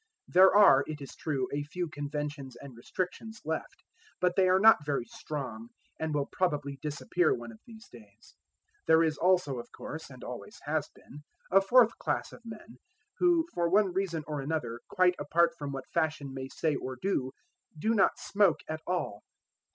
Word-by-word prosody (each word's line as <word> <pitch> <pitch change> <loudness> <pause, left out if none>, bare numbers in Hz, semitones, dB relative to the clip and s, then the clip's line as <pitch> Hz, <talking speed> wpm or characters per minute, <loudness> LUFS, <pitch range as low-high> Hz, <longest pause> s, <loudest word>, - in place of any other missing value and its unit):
There 185 +2 +7
are, 195 -10 +7
it 155 -1 -5
is 140 - -9
true, 135 -5 -2
a 145 - -1
few 175 +4 -4
conventions 145 -3 -5
and 135 -3 -11
restrictions 185 - -5
left; 160 +1 -4 0.4
but 180 -1 +1
they 185 -2 +4
are 185 +1 +5
not 220 -6 +7
very 145 -4 -1
strong, 150 - -6 0.3
and 160 0 -2
will 145 -2 0
probably 145 -6 -2
disappear 155 +3 0
one 120 -1 -8
of 110 - -15
these 225 -1 -13
days. 105 -3 -17 0.5
There 160 0 +6
is 155 -2 0
also, 175 -8 +2
of 120 - -10
course, 160 0 -8
and 130 -2 -12
always 165 - -8
has 150 0 -1
been, 145 +2 -14 0.3
a 195 +1 +6
fourth 230 +3 +5
class - - -2
of - - -13
men, 225 0 -11 0.4
who 345 -2 +4
for 170 -1 +1
one 195 0 +3
reason 180 -4 -1
or 150 -2 -4
another, 135 -5 -3
quite 180 0 +3
apart 170 +2 +3
from 145 -1 -4
what 135 -1 -6
fashion 155 -4 -1
may 130 0 -5
say 155 +3 -1
or 130 -1 -5
do, 130 -9 -1 0.4
do 220 +9 +1
not 200 -4 +3
smoke 200 -5 +2
at 155 0 -4
all. 175 - -2
155 Hz, 180 wpm, -30 LUFS, 140-185 Hz, 0.5 s, There